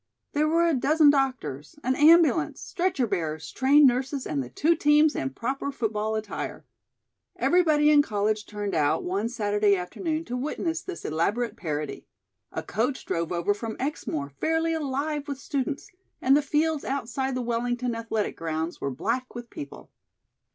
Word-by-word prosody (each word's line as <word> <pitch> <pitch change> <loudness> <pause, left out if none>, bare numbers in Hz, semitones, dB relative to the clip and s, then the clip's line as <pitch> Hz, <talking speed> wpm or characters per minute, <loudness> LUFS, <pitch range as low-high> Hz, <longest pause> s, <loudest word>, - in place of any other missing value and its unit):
There 300 +1 +2
were 335 +2 +3
a 335 - +3
dozen 300 +3 +5
doctors, 255 - -2
an 260 +1 +1
ambulance, 320 +3 +5
stretcher 350 -8 -1
bearers, 160 -7 -3
trained 280 +3 +5
nurses 265 +2 +1
and 145 -2 -1
the 125 - -7
two 315 - +2
teams 300 0 +4
in 135 - -1
proper 265 - -3
football 220 -4 -2
attire. 215 -1 -5 0.7
Everybody 310 -4 +4
in 295 -1 +7
college 210 -3 -1
turned 205 -1 -4
out 155 0 +2
one 200 +5 -1
Saturday 205 -3 +2
afternoon 310 - -3
to 245 - -4
witness 320 +5 -2
this 370 -2 -7
elaborate 205 +10 0
parody. 150 -4 -4 0.4
A - - -4
coach 245 +6 -2
drove 165 0 -2
over 175 +3 +1
from 220 +2 -6
Exmoor 160 - -3
fairly 325 - 0
alive 295 0 -2
with 280 -2 -4
students, 275 0 -3 0.3
and 265 +2 +4
the 295 - +4
fields 300 +1 0
outside 265 0 -2
the 255 - -2
Wellington 240 +1 -1
athletic 225 -2 -2
grounds 165 +1 -3
were 140 - -1
black 235 - -3
with 240 -1 -8
people. 140 - -9
250 Hz, 160 wpm, -26 LUFS, 205-295 Hz, 0.7 s, in